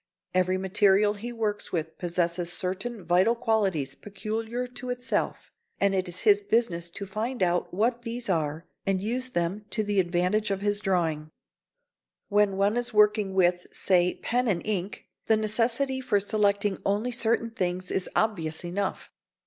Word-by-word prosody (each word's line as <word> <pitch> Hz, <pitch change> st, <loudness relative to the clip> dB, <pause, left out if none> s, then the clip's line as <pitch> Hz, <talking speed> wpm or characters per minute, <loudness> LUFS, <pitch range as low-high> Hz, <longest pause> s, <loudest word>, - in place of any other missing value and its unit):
Every 185 Hz, 0 st, +2 dB
material 195 Hz, +2 st, +3 dB
he 225 Hz, +4 st, -6 dB
works 215 Hz, -3 st, -3 dB
with 160 Hz, -2 st, -3 dB
possesses 175 Hz, 0 st, -1 dB
certain 190 Hz, +4 st, -3 dB
vital 185 Hz, +7 st, +3 dB
qualities 195 Hz, -, 0 dB
peculiar 220 Hz, -, -4 dB
to 250 Hz, +1 st, -8 dB
itself, 245 Hz, +1 st, -2 dB, 0.3 s
and 200 Hz, 0 st, +3 dB
it 185 Hz, -1 st, 0 dB
is 175 Hz, -, -5 dB
his 415 Hz, -1 st, +5 dB
business 220 Hz, -, 0 dB
to 200 Hz, +4 st, -7 dB
find 215 Hz, +3 st, -2 dB
out 175 Hz, 0 st, 0 dB
what 230 Hz, +6 st, 0 dB
these 235 Hz, 0 st, -5 dB
are 160 Hz, -2 st, -1 dB, 0.2 s
and 195 Hz, -1 st, +1 dB
use 245 Hz, +6 st, -1 dB
them 175 Hz, +1 st, -2 dB
to 215 Hz, -, 0 dB
the 205 Hz, -1 st, +1 dB
advantage 180 Hz, +4 st, +1 dB
of 195 Hz, -1 st, -1 dB
his 205 Hz, 0 st, +1 dB
drawing. 165 Hz, -6 st, 0 dB, 1.0 s
When 205 Hz, -2 st, +3 dB
one 200 Hz, +4 st, +2 dB
is 245 Hz, 0 st, -1 dB
working 210 Hz, -2 st, +4 dB
with, 180 Hz, -1 st, +2 dB
say, 180 Hz, -1 st, +2 dB
pen 245 Hz, +1 st, +1 dB
and 185 Hz, -6 st, 0 dB
ink, 200 Hz, -2 st, -3 dB, 0.2 s
the 220 Hz, -, +4 dB
necessity 235 Hz, +5 st, +1 dB
for 230 Hz, -5 st, +2 dB
selecting 205 Hz, -1 st, +1 dB
only 210 Hz, +5 st, 0 dB
certain 230 Hz, 0 st, +1 dB
things 185 Hz, -3 st, -2 dB
is 190 Hz, -, -1 dB
obvious 165 Hz, -7 st, 0 dB
enough. 190 Hz, +3 st, -3 dB
200 Hz, 155 wpm, -27 LUFS, 180-225 Hz, 1.0 s, his